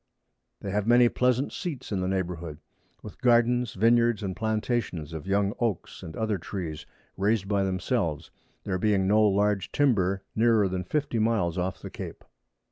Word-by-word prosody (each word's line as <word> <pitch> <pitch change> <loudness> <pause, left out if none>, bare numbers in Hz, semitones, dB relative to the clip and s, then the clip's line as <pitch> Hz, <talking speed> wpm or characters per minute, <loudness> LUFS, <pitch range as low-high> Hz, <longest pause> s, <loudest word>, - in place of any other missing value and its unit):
They 100 - -4
have 105 +1 -1
many 120 0 +6
pleasant 125 +3 +1
Seats 160 - -5
in 95 -2 -1
the 90 - -1
Neighbourhood, 85 -5 -3 0.5
with - - -11
Gardens, 120 0 +3
Vineyards, 115 +1 +3
and 95 -2 -3
Plantations 110 - -2
of 80 +3 -7
young 100 +1 +1
Oaks, 115 -7 -2
and 80 - -8
other 110 -3 -1
Trees 80 -4 -6 0.3
raised 100 0 +1
by 100 -1 +1
themselves; 90 - -1 0.3
there 95 -2 -2
being 100 -2 +2
no 105 +2 +4
large 100 -1 +2
Timber 100 -9 +2
nearer 110 -2 +4
than 90 -1 -3
50 145 -4 -1
Miles 110 -7 +1
off 95 +1 -3
the - - -7
Cape. - - -8
100 Hz, 160 wpm, -27 LUFS, 95-115 Hz, 0.5 s, many